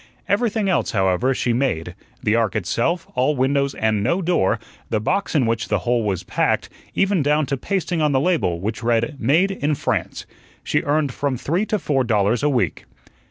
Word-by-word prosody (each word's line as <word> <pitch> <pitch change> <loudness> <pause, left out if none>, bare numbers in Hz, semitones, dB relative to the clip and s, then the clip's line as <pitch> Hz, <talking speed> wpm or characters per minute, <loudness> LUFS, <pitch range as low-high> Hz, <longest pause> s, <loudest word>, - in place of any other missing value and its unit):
Everything 210 +1 +1
else, 180 -6 +1
however, 95 +5 +2
she 125 -2 0
made 90 -10 -1 0.3
the 105 - +2
ark 115 -3 +1
itself, 120 - 0
all 130 +4 +1
windows 140 +1 +1
and 110 -2 +1
no 170 - +1
door; 175 - +1 0.3
the 110 - +1
box 185 - -1
in 135 -5 +3
which 115 0 -1
the - - +1
whole 120 -1 +2
was 95 -4 -1
packed; - - 0 0.3
even 195 -3 +2
down 150 +1 +2
to 135 - -1
pasting 175 +3 -2
on 150 -1 +2
the 135 - +3
label, 145 - +1
which 105 +6 -3
read, 120 +5 0
"Made 160 - +3
in 150 -5 -1
France." - - -2 0.4
She - - +1
earned 145 -2 0
from 140 -1 -1
three 175 - -1
to 215 - 0
four 140 -8 0
dollars 110 0 +1
a 150 - +2
week. 120 - -1
135 Hz, 190 wpm, -21 LUFS, 115-160 Hz, 0.4 s, in